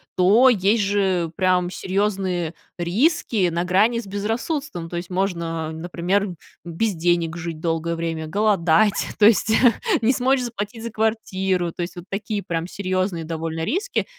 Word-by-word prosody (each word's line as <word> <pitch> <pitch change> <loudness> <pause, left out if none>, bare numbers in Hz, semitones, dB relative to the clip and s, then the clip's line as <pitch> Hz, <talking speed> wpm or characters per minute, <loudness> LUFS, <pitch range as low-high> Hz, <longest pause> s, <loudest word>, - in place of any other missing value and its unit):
то 210 +8 +6
есть 210 -1 +2
же 190 -4 +1
прям 180 -1 +1
серьезные 190 -4 -1 0.2
риски 200 - +1
на 170 +1 -1
грани 205 +6 +3
с 235 - -7
безрассудством. 215 - -3
То 175 - -4
есть, 175 +1 -6
можно, 170 -4 -2
например, 175 +5 -1 0.4
без 180 +5 -1
денег 170 -1 0
жить 170 -2 -5
долгое 165 0 -1
время, 165 -1 -3
голодать, 200 0 +2
то 210 - +5
есть, 220 0 +4 0.5
не 235 +4 +3
смочь 260 +1 +2
заплатить 225 -1 -5
за 235 - -5
квартиру. 190 -5 -1
То 175 - -7
есть, 175 +2 -4
вот 175 - -9
такие 205 +1 -3
прям 165 0 -3
серьезные 185 -3 -2
довольно 160 0 -4
риски. 390 - -1
185 Hz, 150 wpm, -22 LUFS, 170-210 Hz, 0.5 s, то